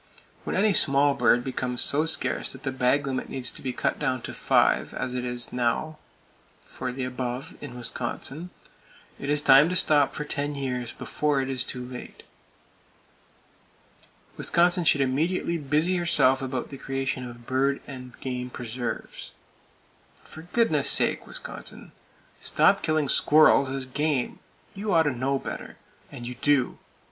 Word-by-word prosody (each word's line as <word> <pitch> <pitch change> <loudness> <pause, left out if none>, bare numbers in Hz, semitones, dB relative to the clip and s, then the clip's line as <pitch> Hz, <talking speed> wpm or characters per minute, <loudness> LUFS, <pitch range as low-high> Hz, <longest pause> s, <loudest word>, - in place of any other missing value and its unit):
When - - -2
any 205 +2 +3
small 140 -3 +4
bird 120 -3 +3
becomes 125 -1 -2
so 150 +3 +2
scarce 160 - 0
that 135 0 -12
the 135 - -1
bag 130 +2 +2
limit 130 -2 -3
needs 130 -2 -2
to - - -11
be 130 - -2
cut - - -1
down 130 -4 -1
to - - -6
five, - - +2
as 125 - -3
it 125 -1 -3
now 125 +6 -1 0.6
is - - -23
for 130 - -5
the 130 +1 -4
above 125 0 -4
in 125 -4 -8
Wisconsin, 130 +7 -4 0.7
it 140 - -5
is 150 0 +1
time 140 +3 +7
to 180 - -1
stop 150 -5 +3
for 150 - -3
ten 145 0 -3
years, 125 -3 -3
before 150 +2 -1
it 135 0 -2
is 130 -1 -1
too 125 -1 -5
late. 125 0 -9 2.1
Wisconsin 175 0 +2
should 145 - +4
immediately 165 +6 0
busy 155 +6 +1
herself 170 -7 +3
about 130 -2 -3
the 135 - -9
creation 135 -1 -2
of 120 0 -13
bird 135 +2 +1
and 125 -3 -10
game 125 -1 -4
preserves. 120 0 -5 0.9
For 160 - -11
goodness 160 - +3
sake, - - +2
Wisconsin, - - -8 0.5
stop - - +3
killing 155 -2 +1
squirrels 145 0 +5
as 135 0 -3
"game!" 140 0 -1 0.3
You 205 0 -1
ought 165 - +6
to 145 - +1
know 135 +3 0
better—and 120 -2 -9
you 125 - -5
do! 135 +1 +1
135 Hz, 155 wpm, -26 LUFS, 125-150 Hz, 2.1 s, time